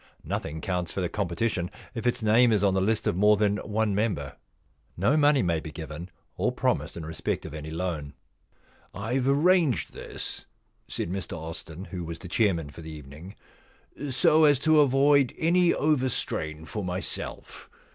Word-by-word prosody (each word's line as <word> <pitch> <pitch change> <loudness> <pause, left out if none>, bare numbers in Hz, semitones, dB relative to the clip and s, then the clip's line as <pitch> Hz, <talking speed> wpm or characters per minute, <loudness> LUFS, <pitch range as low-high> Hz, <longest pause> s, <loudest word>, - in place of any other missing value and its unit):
Nothing 80 +1 -4
counts 90 -2 -2
for - - -4
the 90 -2 -1
competition 95 -1 -1 0.2
if 125 0 -3
its 120 -1 0
name 115 +3 +5
is 105 -2 +2
on 100 -2 +4
the 95 - +2
list 110 +3 +1
of - - +1
more 105 +3 +5
than 105 0 +2
one 105 0 -1
member. 95 -9 -1 0.6
No 105 - +3
money 145 -4 +4
may 85 -3 +1
be 80 - -8
given 80 +3 -7 0.3
or - - +1
promised - - -1
in 80 - -6
respect 80 0 -3
of - - -7
any 80 0 -6
loan.* 80 -4 -4 0.4
* - - -28
IVe 125 +6 0
arranged 160 -1 +3
this/ - - -7 0.4
said 85 - -4
Mr 95 -3 -4
Austin, 80 +2 -7
who 90 -4 -6
was 85 0 -6
the 90 - -9
chairman 85 -7 +1
for 85 - -11
the 80 0 -8
evening, 75 +6 -10 0.4
* 145 +1 -9
so 155 +4 +4
as 145 -2 +5
to 155 +3 +4
avoid 140 -1 +4
any 175 +2 +3
overstrain 125 - -1
for 105 +4 -4
myself. 90 0 -5
100 Hz, 175 wpm, -27 LUFS, 85-125 Hz, 0.6 s, name